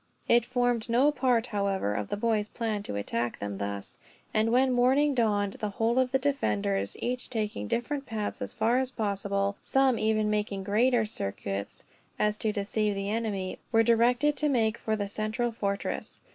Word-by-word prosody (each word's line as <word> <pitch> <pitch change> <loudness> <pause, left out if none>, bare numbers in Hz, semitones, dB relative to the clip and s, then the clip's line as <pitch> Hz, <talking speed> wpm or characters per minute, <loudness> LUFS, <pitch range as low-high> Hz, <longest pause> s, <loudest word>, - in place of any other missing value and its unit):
It 235 -1 +4
formed 245 -2 0
no 255 +6 +4
part, 250 -4 +2
however, 200 - -1
of 105 0 -3
the - - -2
boys' 215 -1 +1
plan 220 -3 -2
to 200 - -5
attack 115 +4 -2
them 100 -1 -5
thus; 100 0 -5 0.3
and 220 +1 +2
when 260 +2 +4
morning 265 +4 +3
dawned 205 -5 +1
the 210 - -2
whole 225 +5 +1
of 255 -1 +2
the 265 - +4
defenders, 105 - -1
each 250 +1 -3
taking 210 - -3
different 275 - -2
paths, 215 -2 -3
as - - -5
far 230 +3 +2
as 260 -1 -1
possible; 200 -3 -1
some 270 -3 +2
even 215 -1 +1
making 205 -2 -1
great 225 +6 +3
circuits, 100 - -4
so - - -16 0.3
as 210 0 +1
to 215 - 0
deceive 210 0 -1
the 195 +1 -2
enemy, 210 -4 -2
were 225 0 +5
directed 245 +5 +3
to 300 - +1
make 225 -4 +1
for 220 - -1
the 205 -1 -2
central 215 +4 -2
fortress. 200 -3 -3
220 Hz, 180 wpm, -28 LUFS, 200-245 Hz, 0.3 s, were